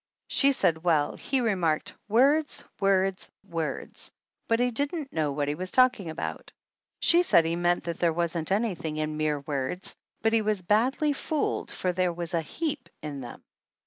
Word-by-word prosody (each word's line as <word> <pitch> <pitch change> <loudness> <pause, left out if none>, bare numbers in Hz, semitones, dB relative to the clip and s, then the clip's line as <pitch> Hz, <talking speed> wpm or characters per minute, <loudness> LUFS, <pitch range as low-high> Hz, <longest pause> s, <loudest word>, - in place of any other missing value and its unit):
She 280 0 +4
said 165 - +1
well, 155 -4 +2
he 265 -1 -1
remarked 180 -9 0
"words, 280 +8 +3 0.2
words, 195 -1 +1 0.2
words," 165 -3 -4 0.4
but 230 0 +2
he 245 0 +2
didn't 285 +3 -2
know 155 -3 0
what 145 0 -1
he 145 - 0
was 185 +4 -3
talking 245 -8 +3
about. 160 - -5 0.5
She 345 +1 +5
said 170 - +5
he 165 +1 0
meant 175 0 +1
that 170 -1 -4
there 170 -1 +3
wasn't 170 0 -2
anything 190 -7 -1
in 155 0 -2
mere 150 -1 0
words, 140 +4 -3 0.3
but 225 0 +3
he 225 - +4
was 210 -3 0
badly 260 - +2
fooled, 300 +1 -2
for 180 - -1
there 180 0 +1
was 170 +1 -2
a 165 - +2
heap 290 - -4
in 145 -3 -5
them. 120 -2 -9
180 Hz, 175 wpm, -27 LUFS, 160-240 Hz, 0.5 s, She